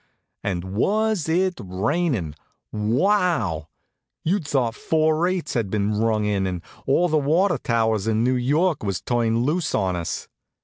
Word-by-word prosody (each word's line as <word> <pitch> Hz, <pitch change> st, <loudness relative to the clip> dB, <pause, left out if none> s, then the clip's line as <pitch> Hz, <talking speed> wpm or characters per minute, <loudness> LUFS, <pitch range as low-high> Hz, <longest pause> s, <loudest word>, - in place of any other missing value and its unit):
And 90 Hz, -3 st, -2 dB
was 195 Hz, -, 0 dB
it 180 Hz, -2 st, +1 dB
rainin'? 105 Hz, -, -1 dB, 0.4 s
Wow! 115 Hz, -, +1 dB, 0.6 s
You'd 175 Hz, -2 st, 0 dB
thought 125 Hz, -5 st, +1 dB
four 155 Hz, +4 st, +1 dB
eights 185 Hz, -2 st, -2 dB
had 115 Hz, -5 st, -1 dB
been 105 Hz, +1 st, 0 dB
rung 110 Hz, -1 st, +1 dB
in 100 Hz, -2 st, 0 dB
and 90 Hz, -2 st, -4 dB, 0.2 s
all 165 Hz, +7 st, +3 dB
the 155 Hz, -2 st, +2 dB
water 160 Hz, +3 st, +2 dB
towers 110 Hz, -3 st, 0 dB
in 110 Hz, 0 st, +2 dB
New 125 Hz, +1 st, +2 dB
York 150 Hz, +7 st, +1 dB
was 100 Hz, -5 st, -2 dB
turned 115 Hz, +1 st, 0 dB
loose 160 Hz, +6 st, 0 dB
on 95 Hz, -3 st, 0 dB
us. 85 Hz, -1 st, -4 dB
120 Hz, 145 wpm, -23 LUFS, 105-165 Hz, 0.6 s, all